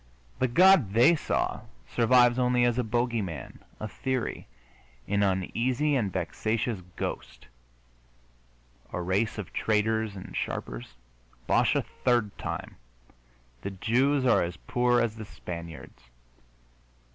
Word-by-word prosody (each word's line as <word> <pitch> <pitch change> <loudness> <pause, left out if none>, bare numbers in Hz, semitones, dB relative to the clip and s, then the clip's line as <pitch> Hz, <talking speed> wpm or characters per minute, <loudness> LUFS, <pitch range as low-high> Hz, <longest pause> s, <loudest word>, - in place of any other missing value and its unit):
The 130 - +3
God 165 - +5
they 120 +9 +6
saw 150 - -1 0.3
survives 120 - +4
only 125 -1 +3
as 120 0 +1
a - - +2
bogey 120 0 0
man, 80 -8 -7 0.2
a 110 - -4
theory, 130 +1 -3 0.6
an 100 0 +1
uneasy 120 +9 +1
and 105 -7 0
vexatious 110 +4 -2
ghost. 60 -1 -5 1.5
A - - -3
race 95 +6 0
of 105 - -6
traders 110 -1 0
and 95 - -9
sharpers? - - -4 0.5
Bosh - - +3
a - - +1
third 120 -5 0
time! - - -5 0.8
The - - -4
Jews 130 +8 +1
are 125 - +4
as 85 0 -3
poor 120 +4 +1
as 115 -2 0
the 110 - -7
Spaniards. 85 -4 -9
110 Hz, 120 wpm, -28 LUFS, 95-125 Hz, 1.5 s, they